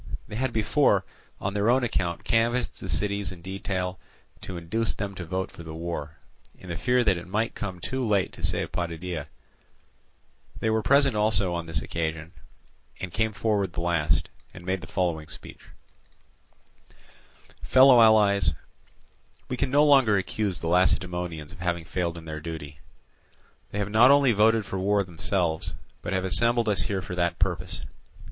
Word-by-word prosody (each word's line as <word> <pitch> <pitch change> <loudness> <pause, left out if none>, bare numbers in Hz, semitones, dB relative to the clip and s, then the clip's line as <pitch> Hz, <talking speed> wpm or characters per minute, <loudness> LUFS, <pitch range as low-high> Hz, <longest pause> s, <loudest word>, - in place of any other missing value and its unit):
They - - -7
had 130 +2 -1
before 110 -2 +2 0.3
on 100 - -3
their 105 +2 +1
own 125 +1 +3
account 90 -7 -1
canvassed 120 +2 0
the 95 - -7
cities 100 +4 0
in 85 -2 -11
detail 95 -1 -3 0.4
to 90 - -6
induce 105 +7 -2
them 100 -1 -4
to 90 -2 -7
vote 95 +3 -3
for - - -11
the 80 -1 -8
war, 80 -2 -5 0.4
in 95 - -12
the 85 - -3
fear 125 +7 +2
that 95 -6 +2
it 85 - -8
might 110 +5 -1
come 95 -3 -5
too 130 +9 -3
late 105 -5 +1
to - - -11
save 90 0 -1
Potidæa; 85 -2 -4 1.3
they 110 - 0
were 110 0 +1
present 140 +2 +4
also 105 -4 +2
on 85 -1 -4
this 80 -4 -2
occasion, 80 0 -3 0.7
and 95 -3 -6
came 110 +2 +1
forward 100 -3 -1
the 85 - -3
last, 85 -3 +1 0.3
and 85 - -11
made 95 0 -1
the - - -9
following 85 -4 -1
speech: - - -8 2.0
"Fellow 130 -2 +7
allies, 105 -3 +5 0.9
we 125 - -1
can 130 - 0
no 145 +3 +4
longer 135 -8 +5
accuse 100 -1 -2
the 80 - -3
Lacedaemonians 90 -3 0
of 90 - -13
having 85 -1 -2
failed 85 -1 -2
in 80 - -10
their 80 -1 -5
duty: 75 -2 -7 0.9
they - - -6
have 105 0 -2
not 115 +4 +7
only 140 -2 +6
voted 110 0 +3
for 95 - -4
war 100 +1 +2
themselves, 90 -2 -2 0.3
but - - -5
have 95 -1 0
assembled 115 +7 +3
us 105 -2 +2
here 95 -2 -2
for - - -7
that 85 -1 0
purpose. 90 -2 -2
95 Hz, 170 wpm, -26 LUFS, 85-110 Hz, 2.0 s, Fellow